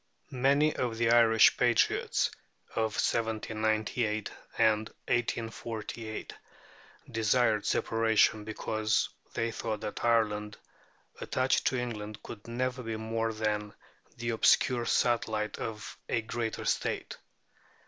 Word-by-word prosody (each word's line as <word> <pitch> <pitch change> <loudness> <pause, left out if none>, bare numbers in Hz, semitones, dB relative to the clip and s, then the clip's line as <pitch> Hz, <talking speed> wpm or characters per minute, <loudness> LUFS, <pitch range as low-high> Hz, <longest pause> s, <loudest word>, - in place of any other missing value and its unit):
Many 140 +4 +3
of 120 -3 -2
the 115 0 +2
Irish 115 -2 +6
patriots - - +2 0.4
of 110 -1 0
1798 110 -1 0 0.3
and 110 -1 +3 0.2
1848 115 -1 -3 0.8
desired 110 -1 +2
Separation, 110 -1 +2
because 110 0 0 0.3
they 115 0 0
thought 110 -2 -4
that 105 - -5
Ireland, 105 -3 +1 0.6
attached 130 +1 +1
to 130 - +1
England, 110 -4 -5
could 105 -1 -10
never 125 +2 -2
be 115 -2 -4
more 115 +1 -1
than 105 -1 -2 0.4
the 115 0 -2
obscure 120 +1 +3
satellite 110 -3 +1
of 110 -2 -5
a 115 - +1
greater 115 0 -3
State. - - -1
115 Hz, 105 wpm, -30 LUFS, 110-120 Hz, 0.8 s, Irish